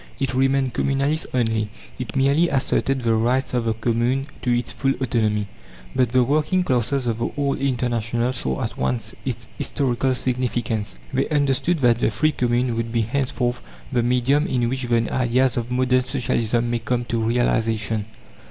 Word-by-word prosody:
It 135 -2 -1
remained 135 -1 +2
communalist 140 +3 0
only; 110 -4 0 0.3
it 125 - -5
merely 140 +5 +3
asserted 135 0 0
the 115 -1 +2
rights 125 +5 +1
of 120 -2 0
the 115 -1 0
Commune 120 +4 0 0.2
to 125 - -2
its 120 0 +1
full 135 0 0
autonomy. 110 -5 0 0.5
But 125 -3 +3
the 130 +1 +3
working 155 +7 +1
classes 130 -2 0
of 115 -1 -1
the 120 - -1
old 140 -1 0
International 120 -2 0
saw 130 - -2
at 115 - -5
once 115 -3 -1
its 120 -3 -4
historical 130 -1 0
significance. 120 -4 -2 0.2
They 135 +1 0
understood 145 +3 +1
that 120 -2 +4
the - - +2
free 155 +9 +1
commune 120 -2 0
would 115 0 -2
be 115 -1 +1
henceforth 125 0 -1 0.3
the 125 -2 +2
medium 125 +5 +2
in 120 -2 0
which 130 0 -2
the 115 -1 +1
ideas 130 +1 +2
of 120 -1 -2
modern 130 0 +2
Socialism 120 -3 0
may 120 - 0
come 120 +1 -1
to 115 -1 -1
realization. 110 -2 +1
125 Hz, 170 wpm, -22 LUFS, 115-135 Hz, 0.5 s, that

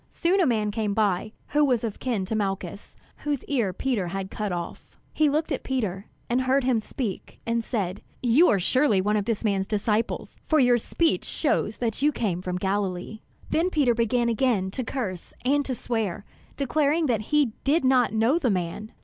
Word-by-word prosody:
Soon 375 +3 +1
a 340 - +4
man 215 -4 +1
came 210 -2 -1
by, 210 -1 +1 0.2
who 295 +1 +3
was 250 -5 +2
of 220 -3 -4
kin 230 -7 -1
to 200 - -4
Malchus, 195 -2 -3 0.2
whose 290 -3 -2
ear 240 -9 0
Peter 210 -2 -1
had 190 +2 -4
cut 210 -2 -3
off. 175 -1 -6 0.2
He 305 -1 +3
looked 310 +3 0
at 275 - -1
Peter, 210 -7 -2 0.2
and 245 +2 +1
heard 260 +1 +2
him 245 -3 +2
speak, 215 -2 -5
and 230 0 0
said: 200 -6 -2 0.2
"You 255 +9 +5
are 205 - +4
surely 245 +2 +3
one 205 +3 +1
of 205 -2 0
this 225 -1 -1
man's 195 -3 0
disciples; 215 +1 -1
for 315 - +2
your 245 -3 +5
speech 330 +8 0
shows 225 -8 0
that 230 0 -2
you 295 +1 +4
came 195 -10 -2
from 180 -1 -3
Galilee." 190 +1 -2 0.3
Then 335 +3 +2
Peter 285 -8 +3
began 235 +1 +1
again 225 -5 +1
to 255 - -3
curse 210 -8 -5
and 285 +2 +3
to 260 - -2
swear, 220 -5 -2 0.3
declaring 295 +4 +1
that 235 -6 +1
he 295 -6 +3
did 280 +1 +2
not 255 -2 +4
know 225 +9 +2
the 265 -7 +1
man. 190 +3 -3
230 Hz, 190 wpm, -26 LUFS, 200-270 Hz, 0.3 s, You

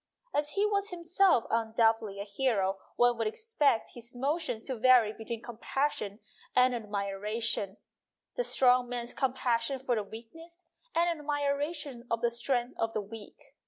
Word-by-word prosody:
As 295 0 0
he 405 +1 +2
was 405 -1 0
'himself 355 - +3
undoubtedly 225 -2 +2
a - - -2
hero 200 -3 0 0.2
one 245 -1 +3
would 225 - +1
expect 295 - +1
his 240 0 -11
emotions 270 -3 -1
to 260 - -3
vary 235 -2 +5
between 225 +1 -6
compassion 240 -2 -2 0.3
and 250 0 +5
admiration 210 -1 -2 0.6
the - - 0
strong 250 - +4
man's 240 -1 -4
compassion 255 -1 0
for 260 -1 -1
the 220 - +1
weak 225 +3 -10
ness 335 +2 -14 0.3
and 340 +1 +4
admiration 290 -3 -2
of 230 0 0
the 235 -1 +2
strength 240 +1 -1
of 225 0 0
the 215 - 0
weak. 210 +1 -11
240 Hz, 150 wpm, -30 LUFS, 225-285 Hz, 0.6 s, vary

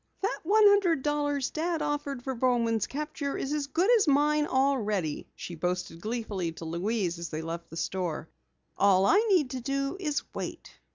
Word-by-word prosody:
"That 405 - 0
one 425 +6 +4
hundred 390 -8 +4
dollars 290 -2 0
Dad 330 +1 -1
offered 285 -3 -3
for 265 - -2
Bowman's 235 -3 +1
capture 295 0 -4
is 275 - -2
as 295 -2 -1
good 340 +7 +1
as 410 - +2
mine 295 +1 +3
already," 215 - 0
she 175 - -7
boasted 175 0 -3
gleefully 210 -6 -3
to 165 - -9
Louise 175 +1 -1
as 170 - -5
they 155 0 -4
left 165 +1 -6
the 165 - -9
store. 170 -2 -2 0.5
"All 195 -1 +5
I 395 - +5
need 335 -10 +3
to 255 - -4
do 275 +6 -2
is 300 -6 -1
wait." - - -7
260 Hz, 175 wpm, -28 LUFS, 185-295 Hz, 0.5 s, All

